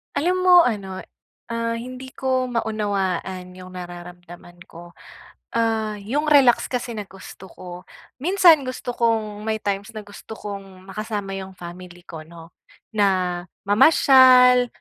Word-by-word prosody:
Alam 360 +4 0
mo 365 - +6
ano, 195 -7 -3 0.5
ah, 230 0 -2
hindi 255 +2 -8
ko 260 -1 -1
maunawaan 195 -5 -3
yung 185 0 -12
nararamdaman 175 0 -11
ko. 170 +1 -14 0.6
Ah, 225 -2 0
yung 290 +9 -2
relax 275 -5 +5
kasi 245 -1 -3
na 215 -2 -5
gusto 190 0 -13
ko, 180 - -13 0.5
minsan 345 -2 +5
gusto 255 -1 -5
kong 220 -3 -1
may 220 0 -1
times 200 +2 -3
na 215 - -6
gusto 205 +2 -11
kong 195 -2 -9
makasama 205 -1 -5
yung 190 0 -10
family 175 0 -11
ko 160 - -9
'no, 165 0 -14 0.4
na 185 -4 0 0.2
mamasyal, 250 +1 +6
210 Hz, 130 wpm, -22 LUFS, 185-245 Hz, 0.6 s, mo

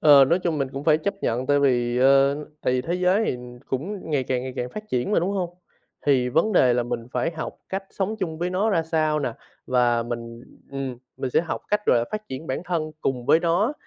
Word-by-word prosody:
Ờ, 145 -3 +8
nói 170 +7 +2
chung 170 -4 -1
mình 135 -1 0
cũng 140 +2 -5
phải 155 -1 +5
chấp 200 +5 -2
nhận, 125 +3 0
tại 145 0 +3
vì, 120 -3 +2
ơ, 135 +1 +5 0.3
tại - - +1
vì 125 - +1
thế 170 +5 -2
giới 180 +4 +2
thì - - -1 0.3
cũng 165 +7 -4
ngày 140 -3 +1
càng, 125 -1 -1
ngày 130 0 -5
càng 125 - -2
phát 215 0 -8
triển 125 +9 -1
mà, - - +4
đúng 180 +4 0
hông? 185 -4 -1 0.6
Thì 130 -3 +3
vấn 165 - +2
đề 125 -8 +5
là 120 - +2
mình 115 -1 -4
phải 165 - 0
học 160 -1 -5 0.2
cách 195 +1 -3
sống 205 +3 -2
chung 165 -4 -3
với 175 +1 -1
nó 200 +4 +1
ra 165 -4 +2
sao 155 -1 +1
nè? 130 -5 -2 0.3
Và 120 -2 +2
mình, 115 0 -6 0.3
ừm, 135 -2 -4 0.2
mình 130 - -3
sẽ - - +4
học 170 - -4
cách 210 0 +3
rồi 120 -1 +4
phát 215 0 -5
triển 135 +5 -6
bản 130 +6 -2
thân 160 -4 -2
cùng 125 -2 -2
với 155 +3 +5
nó, 175 - +2
145 Hz, 240 wpm, -24 LUFS, 125-175 Hz, 0.6 s, Ờ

